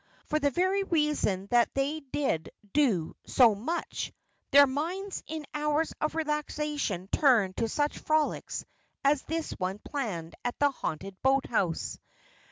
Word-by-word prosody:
For 305 - 0
the 285 -1 +3
very 375 +7 +1
reason 300 - +1
that 240 -1 +4
they 280 +3 0
did 270 - -2 0.2
do 225 - +2
so 240 -4 +6
much, 265 +13 -3 0.4
their 285 0 +8
minds 345 +9 -3
in 310 0 -5
hours 300 +1 0
of 305 - 0
relaxation 300 - -2
turned 225 -10 +4
to 230 - 0
such 290 +4 0
frolics 310 -1 0 0.4
as 280 0 +4
this 325 +1 -3
one 185 +2 -3
planned 210 - -4
at 245 - -2
the 285 -1 +3
haunted 190 - -5
boathouse. 250 -10 +1
285 Hz, 135 wpm, -29 LUFS, 220-305 Hz, 0.4 s, their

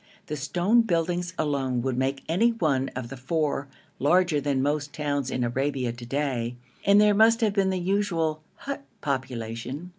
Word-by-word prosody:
The 150 - -4
stone 175 - +2
buildings 175 -2 -1
alone 135 -5 0
would 130 -1 -1
make 135 +1 -1
any 190 +9 +3
one 140 - +1
of 125 -2 -5
the 135 - -6
four 145 +1 -1 0.3
larger 165 0 +3
than 140 -1 0
most 145 0 -1
towns 145 -3 -1
in 125 - -1
Arabia 130 0 -1
to 120 0 -9
day, 125 -3 -1 0.3
and 200 +1 +6
there 210 0 +5
must 225 +3 +5
have 215 -3 +2
been 195 -2 +2
the 190 - 0
usual 175 -4 0
hut 280 0 -6 0.2
population. 130 +2 -4
145 Hz, 170 wpm, -26 LUFS, 130-180 Hz, 0.3 s, and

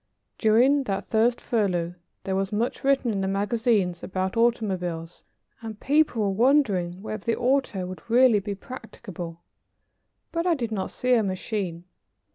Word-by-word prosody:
During 255 +6 +4
that 195 -3 -2
first 235 +2 +2
furlough, 180 -7 0 0.3
there 190 - -2
was 195 0 -1
much 220 +4 -2
written 270 -3 +2
in 200 -2 -1
the 190 - -1
magazines 200 -2 +1
about 185 0 -3
automobiles, 185 -8 -1 0.4
and 220 -2 -7
people 285 -6 +2
were 200 - +1
wondering 195 -10 +2
whether 215 -2 -5
the 230 - +1
auto 250 -7 +1
would 185 +5 -9
really 240 -2 +5
be 200 0 -4
practicable, 180 -7 -9 0.9
but 335 +1 -1
I 345 - +4
did 235 -6 -3
not 195 -3 -2
see 250 0 0
a 235 - +5
machine. 185 -3 -3
215 Hz, 150 wpm, -25 LUFS, 190-240 Hz, 0.9 s, really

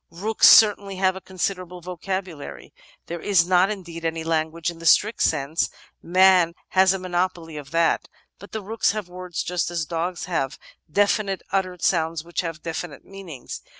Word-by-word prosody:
Rooks 205 +7 +4
certainly 205 -2 +6
have 190 0 +1
a 190 - -8
considerable 185 -1 -4
vocabulary. 180 -2 -6 0.3
There 170 0 -5
is 190 -5 +3
not, 185 +1 +4
indeed, 170 -5 -6
any 165 0 -2
language 160 +1 -1
in 165 - -13
the 165 - -3
strict 215 +7 +4
sense 145 +4 +1 0.2
— - - -42
^man 180 -1 +4
has 190 0 +4
a 195 - 0
monopoly 175 -3 -2
of 145 -2 -8
that; 165 +1 +1 0.3
but 200 - -13
the 220 -2 -5
rooks 220 +1 0
have 210 -4 -5
words 180 -1 -5
just 180 -1 -1
as 170 -2 -2
dogs 170 +3 -3
have, 150 -6 -2 0.3
definite 200 0 +1
ut 195 -1 +2
tered 180 -2 -10
sounds 165 -2 +1
which 170 0 -3
have 165 -3 -6
definite 165 -2 -6
meanings. 185 -10 -9
180 Hz, 175 wpm, -23 LUFS, 165-190 Hz, 0.3 s, certainly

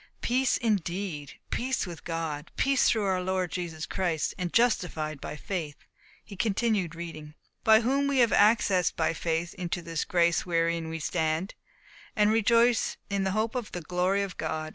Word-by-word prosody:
"Peace 260 +2 +2
indeed! 180 - -2 0.2
Peace 260 -1 -1
with 175 -3 -9
God! 160 -3 -4
Peace 275 -1 +3
through 220 -3 +1
our 190 -1 +1
Lord 185 -1 -1
Jesus 165 -3 -4
Christ 170 -5 -1
and 180 -2 -3
justified 165 - +1
by - - -5
faith." 155 -3 -4 0.5
He 205 - -11
continued 200 -4 0
reading: 155 -3 -8 0.3
"By 220 -1 +6
whom 275 +4 +1
we 280 -1 +1
have 235 -4 +4
access 205 -4 +4
by 160 0 0
faith 165 +1 -2
into 175 -1 -3
this 165 -1 -2
grace 170 -1 +2
wherein 165 -1 0
we 165 - -4
stand, 160 +3 -1 0.6
and 210 0 +4
rejoice 230 +2 +3
in 195 -1 0
hope 215 +4 0
of 245 -4 -4
the 175 - -4
glory 180 +4 0
of 195 -2 -6
God. 155 0 -3
180 Hz, 165 wpm, -28 LUFS, 165-215 Hz, 0.6 s, By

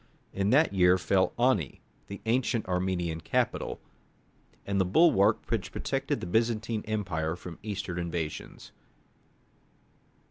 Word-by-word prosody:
In 100 +1 0
that 145 +1 +4
year 90 -1 +5
fell 95 +1 +2
Ani, 120 - +1 0.3
the 100 0 -8
ancient 115 -1 +1
Armenian 90 -3 -1
capital, - - -1 0.9
and 100 -1 +1
the - - +4
bulwark 100 - +4
which - - -1
protected - - -2
the - - -4
Byzantine 110 +2 0
Empire 90 -7 -2
from 90 -2 -10
Eastern 100 -4 -4
invasions. 85 -3 -5
95 Hz, 115 wpm, -29 LUFS, 90-110 Hz, 0.9 s, year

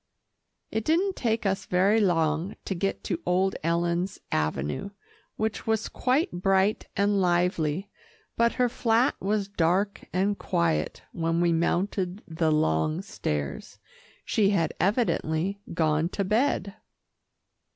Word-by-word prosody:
It 220 - -1
didn't 370 - +1
take 225 -2 -1
us 195 -1 -1
very 195 +5 +3
long 165 -1 +1
to - - -1
get 195 +2 -2
to 175 -3 -3
old 185 +2 +1
Ellen's 170 +3 0
avenue, 75 - -1 0.5
which 220 0 -3
was 220 -1 +1
quite 265 +6 +1
bright 190 +3 +1
and 200 0 +2
lively, 175 -1 +1 0.5
but 235 0 +3
her 250 -1 +2
flat 235 +1 +2
was 200 +1 0
dark 195 +2 0
and 195 +3 0
quiet, 80 -3 0
when 165 0 -1
we 170 -1 +3
mounted 180 +3 0
the 160 -1 0
long 80 - +1
stairs. 75 -2 -4 0.5
She 205 -3 +2
had 170 -6 +1
evidently 195 -3 0
gone 160 0 +1
to 200 - -2
bed. 210 -1 +1
185 Hz, 125 wpm, -27 LUFS, 165-205 Hz, 0.5 s, very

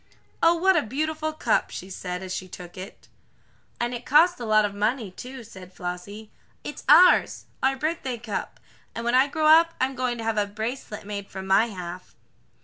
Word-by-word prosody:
"Oh, 335 +1 +5
what 380 +3 +3
a 325 - +4
beautiful 310 +6 -2
cup," 310 - 0
she 185 - -7
said, 180 0 -5
as 185 -1 -5
she 185 - -5
took 175 -1 -11
it. 190 +1 -10 0.7
"And 240 +1 -1
it 240 0 -5
cost 330 +6 +4
a 240 - -5
lot 215 -1 +4
of 205 - -3
money, 210 +1 -1
too," 255 +6 -9
said 185 -4 -13
Flossie. 185 +5 -7 0.3
"It's - - -7
ours 365 - +6 0.2
our 270 +1 +2
birthday 300 -5 -2
cup, 220 -2 -5 0.4
and 230 - -5
when 240 - +1
I 260 +2 +5
grow 310 +2 -2
up 330 +2 +6
I'm 260 +1 0
going 250 -2 -2
to 225 - -6
have 225 -1 0
a 205 - 0
bracelet 220 +1 -5
made 200 -1 -6
from 190 0 -7
my 195 +4 +4
half." 180 -3 -8
230 Hz, 195 wpm, -25 LUFS, 200-270 Hz, 0.7 s, ours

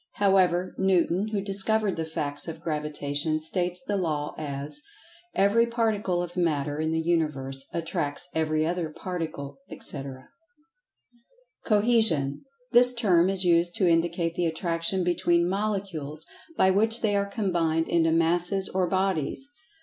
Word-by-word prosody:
However, 185 -2 +2
Newton, 190 +1 +2
who 215 -2 -2
discovered 200 +1 0
the 160 - -3
facts 145 -2 -2
of[Pg 165 - -4
80] - - -27
Gravitation, 150 -1 -2
states 175 +2 -1
the 205 +2 -2
Law, 155 -5 -2
as: 145 - -5 0.5
"Every 210 +4 +3
particle 215 -6 0
of 175 0 -8
matter 150 -4 -1
in 160 0 -1
the 160 - 0
Universe, 150 -5 -1
attracts 165 -1 -2
every 155 -1 0
other 170 -1 -2
particle," 155 -5 -6
etc. 135 -1 -7 1.4
Cohesion: 205 - +2 0.3
This 245 +1 +9
term 185 -6 +3
is 195 -1 +1
used 170 0 +3
to 195 -5 +2
indicate 170 0 +1
the 175 0 0
attraction 165 +2 -1
between 175 -1 +2
Molecules, 190 -7 -3 0.3
by 190 - +4
which 220 +4 +2
they 210 -2 +1
are 200 0 0
combined 170 -6 0
into 165 -1 +2
Masses 175 +4 +1
or 185 -1 0
Bodies. 190 - -1
175 Hz, 135 wpm, -26 LUFS, 155-195 Hz, 1.4 s, This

